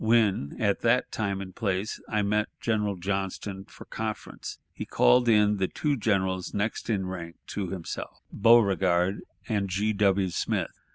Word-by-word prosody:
When 110 -10 +2
at 100 -2 +1
that 120 +2 +2
time 100 -3 -2
and 95 -1 -8
place 100 -1 -2
I 105 -1 +1
met 105 +1 +1
General 105 -3 0
Johnston 95 +1 -3
for - - -13
conference, - - -5 0.2
he - - -5
called 125 -1 +4
in 105 -2 +4
the 95 -1 +1
two 150 - -1
generals 95 -5 0
next 105 +3 -2
in 100 -4 0
rank 85 -3 -6
to 100 -2 -3
himself, 90 -2 -6
Beauregard 95 -4 +4 0.3
and 100 -3 0
G. 105 +4 0
W. 100 -2 +2
Smith. - - -1
100 Hz, 155 wpm, -27 LUFS, 95-110 Hz, 0.3 s, called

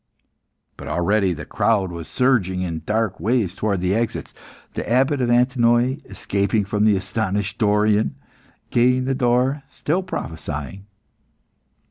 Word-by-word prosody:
But - - -9
already 95 +2 +1
the 75 -3 -5
crowd 95 -2 +1
was 85 -2 -7
surging 105 -9 +1
in 85 -3 -4
dark 110 -2 0
waves 110 -5 +1
towards 100 -3 -1
the 90 +1 +2
exits. 115 +1 -2 0.4
The - - -4
Abbot 130 +3 +2
of 120 - +1
Antinoe, 120 +1 +3
escaping 100 +1 -1
from 105 +1 0
the 105 -2 +5
astonished 100 +1 -2
Dorion, 105 0 +2 0.6
gained 125 +1 +3
the 135 - 0
door, 130 +2 +1
still 165 +6 -1
prophesying. 80 - -6
110 Hz, 130 wpm, -22 LUFS, 95-125 Hz, 0.6 s, the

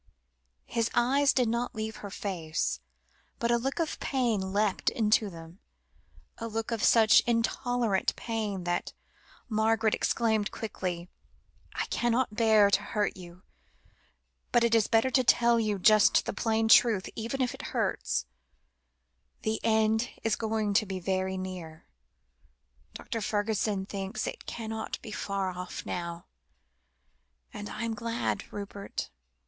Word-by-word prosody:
His 230 -1 -1
eyes 270 +4 +4
did 250 -3 +2
not 235 +3 -1
leave 220 0 -4
her 205 - -7
face, 160 - -2 0.6
but 235 0 0
a 235 - +4
look 270 +3 -2
of 330 -3 -2
pain 225 -8 0
leapt 205 -1 +1
into 215 -1 +2
them, 165 +1 -12 0.8
a 230 - -4
look 225 +1 -3
of 230 -2 -2
such 220 -2 +6
intolerable 235 -2 +1
pain, 215 -5 -3
that 175 0 -2 0.5
Margaret 220 -1 +2
exclaimed 220 -3 +1
quickly 180 -5 -4 0.7
"I - - -1
cannot 240 -1 +1
bear 215 -2 +5
to 200 - +3
hurt 205 0 -1
you, 180 0 -12 1.1
but 240 -1 +4
it 235 -1 +2
is 225 -2 +4
better 225 +3 +3
to 255 0 +3
tell 235 -1 +4
you 215 -2 0
just 215 +2 +5
the - - -3
plain 225 +1 +1
truth, 220 -3 +5
even 230 +4 -4
if 255 -2 0
it - - -8
hurts - - -1 1.2
you. 220 - +1
The 220 - -2
end 220 +1 +2
is 225 -2 +2
going 220 -2 -1
to 215 +1 +3
be 190 -1 -4
very 190 +1 -1
soon. 180 -4 -7 1.1
Dr. 225 - -4
Fergusson 205 -1 0
thinks 195 +2 -4
it - - -6
can't 220 -1 -5
be 220 - -8
far 195 -2 -2
off 180 0 -7
now, 170 -1 -4 1.3
and 205 0 -6
I 215 - -5
am 230 -1 -1
glad, 230 +2 -3
Rupert. 200 - -6
220 Hz, 140 wpm, -29 LUFS, 195-230 Hz, 1.3 s, such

